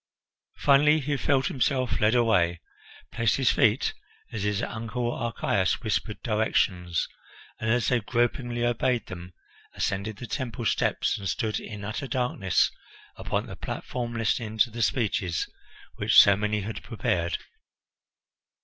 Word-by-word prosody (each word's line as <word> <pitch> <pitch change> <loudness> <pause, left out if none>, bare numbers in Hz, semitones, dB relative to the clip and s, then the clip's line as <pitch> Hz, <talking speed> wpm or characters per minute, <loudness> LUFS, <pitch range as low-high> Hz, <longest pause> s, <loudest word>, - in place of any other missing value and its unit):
Finally 150 +2 +5
he 145 0 -1
felt 135 0 +1
himself 130 -1 0
led 105 +3 +4
away, 90 -8 +3 0.5
placed 115 -2 +1
his 135 -2 +3
feet 115 -2 +2 0.4
as 110 - -4
his 105 +2 0
Uncle 120 +1 -3
Archias 100 -4 0
whispered 110 -1 -1
directions, 95 - 0 0.5
and 110 - -2
as 120 +1 +2
they 125 - +3
gropingly 120 +1 0
obeyed 120 -1 +1
them 90 0 -9 0.4
ascended 100 +2 -2
the 120 - -7
temple 120 -1 -4
steps - - +1
and 100 -2 -3
stood 110 -3 -1
in 105 -2 -8
utter 110 +6 -4
darkness 125 - +1 0.4
upon - - -2
the - - -8
platform 120 -2 -5
listening 110 -1 -1
to 110 +2 +3
the 120 +1 -5
speeches 100 - 0 0.5
which - - +6
so 100 - +8
many 105 +1 -1
had 105 +3 -5
prepared. 85 -7 -1
115 Hz, 135 wpm, -27 LUFS, 105-125 Hz, 0.5 s, so